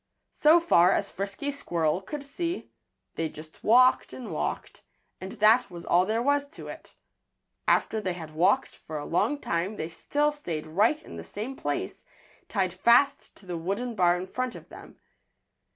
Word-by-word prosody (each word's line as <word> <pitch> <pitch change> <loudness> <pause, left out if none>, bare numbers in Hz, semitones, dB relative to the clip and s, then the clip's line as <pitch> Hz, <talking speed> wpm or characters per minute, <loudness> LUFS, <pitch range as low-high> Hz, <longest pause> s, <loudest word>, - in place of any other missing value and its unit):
So 310 +3 +6
far 185 - +5
as 200 - -1
Frisky 200 +9 -4
Squirrel 170 - -1
could 285 +9 -7
see, 340 +5 -4 0.4
they 165 -1 -2
just 155 +1 -13
walked 255 +3 +5
and 250 -3 -7
walked, - - -4 0.4
and 190 +1 -7
that 225 +3 +4
was 175 -2 -9
all 180 +2 +3
there 225 +2 0
was 285 +1 +2
to - - -10
it. - - -11 0.7
After 220 - +2
they 185 -3 -2
had 160 -3 -9
walked 190 +11 +2
for 155 - -7
a 145 - -5
long 215 +12 +1
time 180 -4 -2
they 160 -4 -4
still 290 - 0
stayed 170 - -5
right 205 - +2
in - - -10
the - - -7
same 225 +6 -6
place, - - -4 0.5
tied 185 -4 0
fast 235 +9 +3
to 200 - -18
the 175 -2 -4
wooden 200 +8 -2
bar 180 -4 +3
in 180 - -4
front 255 +4 -3
of - - -12
them. - - -13
205 Hz, 175 wpm, -27 LUFS, 175-265 Hz, 0.7 s, So